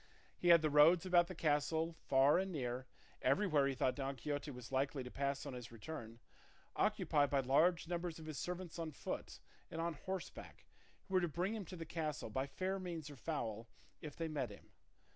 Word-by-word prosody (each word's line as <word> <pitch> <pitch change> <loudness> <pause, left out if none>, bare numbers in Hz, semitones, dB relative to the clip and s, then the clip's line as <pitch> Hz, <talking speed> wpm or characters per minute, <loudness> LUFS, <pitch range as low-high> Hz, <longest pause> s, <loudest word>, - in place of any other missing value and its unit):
He 175 - -2
had 170 -2 +8
the 155 - +2
roads 160 +5 +7
about 175 -2 +5
the 185 - -7
castle 160 +1 +1
far 135 +4 +5
and 190 0 -1
near, 130 -4 -3 0.3
everywhere 155 -9 +3
he 135 - -1
thought 125 0 +2
Don 135 -1 -3
Quixote 145 +3 -3
was 125 -3 -8
likely 135 0 0
to 125 - -8
pass 140 0 -1
on - - -5
his 120 -2 -7
return, 115 -1 -7 0.6
occupied 145 -2 +2
by 140 -1 +2
large 160 +7 +3
numbers 175 -1 -2
of 160 - -9
his 155 -2 -5
servants 180 -1 -4
on 160 -2 -3
foot - - -5 0.3
and 165 - -5
on 170 0 0
horseback, 185 +4 -6 0.4
who 195 - -11
were 185 - +5
to 175 - +1
bring 180 +6 -1
him 215 -4 -4
to 180 - -8
the 165 -2 -6
castle, 155 -7 -3
by 130 +5 -1
fair 190 +6 -2
means 165 -5 -5
or - - -9
foul, 115 -7 -3 0.3
if 150 -3 -7
they 165 - -2
met 145 -6 -2
him. 100 - -13
155 Hz, 200 wpm, -38 LUFS, 135-170 Hz, 0.6 s, had